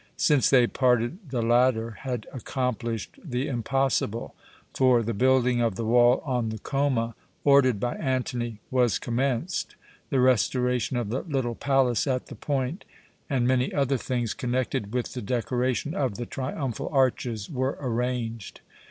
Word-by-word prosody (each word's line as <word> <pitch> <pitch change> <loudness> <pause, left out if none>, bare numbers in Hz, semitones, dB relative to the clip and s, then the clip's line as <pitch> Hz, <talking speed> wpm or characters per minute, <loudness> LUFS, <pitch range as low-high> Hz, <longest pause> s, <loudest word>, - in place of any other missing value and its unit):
Since 145 -4 +3
they 125 -3 +6
parted 125 +5 +1
the 125 -3 -1
latter 120 -1 +3
had 120 0 -5
accomplished 120 -4 -3
the 130 -4 -2
impossible; 125 -2 -1 0.4
for 125 -3 +4
the 115 +1 -2
building 125 +1 +3
of 115 -4 +1
the 115 - -3
wall 120 +2 +4
on 125 -5 0
the 110 - -4
Choma, 130 -2 0 0.3
ordered 135 -6 +5
by 120 +3 -1
Antony, 125 -4 -2
was 125 -3 +3
commenced, 130 +7 -2 0.3
the 135 - +1
restoration 125 -1 +2
of 120 -4 -2
the 125 +4 -1
little 135 -8 -2
palace 135 0 +1
at 130 -2 0
the 135 - -8
point, 135 - -2 0.5
and 130 -4 +1
many 130 0 +2
other 140 -2 +1
things 120 -3 -2
connected 125 -3 -2
with 125 0 -2
the 125 - -4
decoration 125 +5 -1
of 135 - -1
the 120 - -4
triumphal 130 -1 -4
arches, 125 -6 +1
were 130 0 -2
arranged. 120 -3 -3
125 Hz, 145 wpm, -26 LUFS, 120-130 Hz, 0.5 s, they